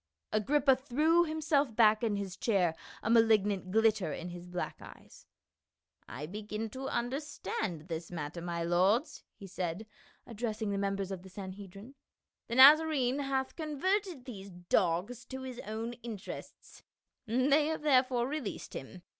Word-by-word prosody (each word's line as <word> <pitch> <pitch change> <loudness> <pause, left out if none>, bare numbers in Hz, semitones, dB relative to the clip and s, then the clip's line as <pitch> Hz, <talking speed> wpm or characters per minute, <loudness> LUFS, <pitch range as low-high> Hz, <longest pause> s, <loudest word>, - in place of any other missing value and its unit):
Agrippa 270 +5 +3
threw 305 +7 +2
himself 300 -6 0
back 215 -2 +5
in 220 -3 0
his 195 -2 -4
chair, 190 -8 +1 0.3
a - - -3
malig 225 -3 +5
nant 195 -3 -2
glitter 215 -4 +2
in 170 +5 -5
his 175 0 -9
black 180 0 -4
eyes. - - -14 0.4
" 75 +3 -29
I 150 - -4
begin 210 +4 -5
to 265 +3 -5
understand 235 - -3
this 165 -1 -5
matter, 165 0 -5
my 170 -1 -3
lords," 185 - +2
he 200 - -11
said, 185 +1 -4 0.4
addressing 220 -2 -3
the 200 - -1
mem 200 0 0
bers 195 -1 -4
of 190 -2 -5
the 190 - -13
Sanhedrim. 195 +4 -9 0.5
"The 235 - -3
Nazarcne 280 -1 +7
hath 270 -1 -1
con 305 -3 -5
verted 375 -6 0
these 200 -6 -8
dogs 180 +5 0
to 260 +1 -7
his 255 -2 -7
own 225 +2 -4
interests; 220 -4 -9 0.5
they 275 +6 +3
have 315 -1 -3
therefore 255 -4 +3
released 280 -6 -5
him. 175 +7 -8
220 Hz, 155 wpm, -32 LUFS, 185-265 Hz, 0.5 s, Nazarcne